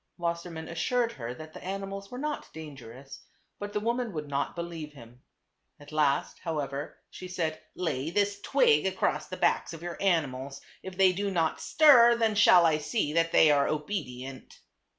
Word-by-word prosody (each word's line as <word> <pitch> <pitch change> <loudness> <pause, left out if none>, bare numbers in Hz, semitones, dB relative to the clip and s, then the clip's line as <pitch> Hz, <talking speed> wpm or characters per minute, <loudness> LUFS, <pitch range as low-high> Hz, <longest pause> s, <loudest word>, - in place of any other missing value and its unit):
Wassermann 170 -1 -4
assured 230 +8 0
her 120 - -6
that 155 +3 -11
the - - -10
animals 195 +1 -5
were 250 - -8
not 300 +2 -4
dangerous, 135 -4 -10 0.4
but 205 0 -5
the 210 - -1
woman 235 0 -2
would 150 -2 -5
not 140 0 -2
believe 170 -3 -6
him. 120 -2 -15 0.6
At 145 +1 -14
last, 150 -3 +1
however, 145 -4 -4
she 185 - -9
said, 165 -3 -3
"Lay 160 -5 -2
this 200 +2 0
twig 170 - +3
across 155 -5 -1
the 185 - -7
backs - - +1
of 165 0 -9
your 175 -1 -6
animals. 140 -7 0 0.2
If 190 -1 -9
they 190 -1 +5
do 200 +2 -2
not 165 -4 0
stir, 245 -6 +6
then 225 -2 +1
shall 185 -4 +6
I 155 -2 +3
see 150 -1 -1
that 165 0 +2
they 155 - +6
are 140 -1 +3
obedient." 135 -6 -5
165 Hz, 170 wpm, -28 LUFS, 145-195 Hz, 0.6 s, stir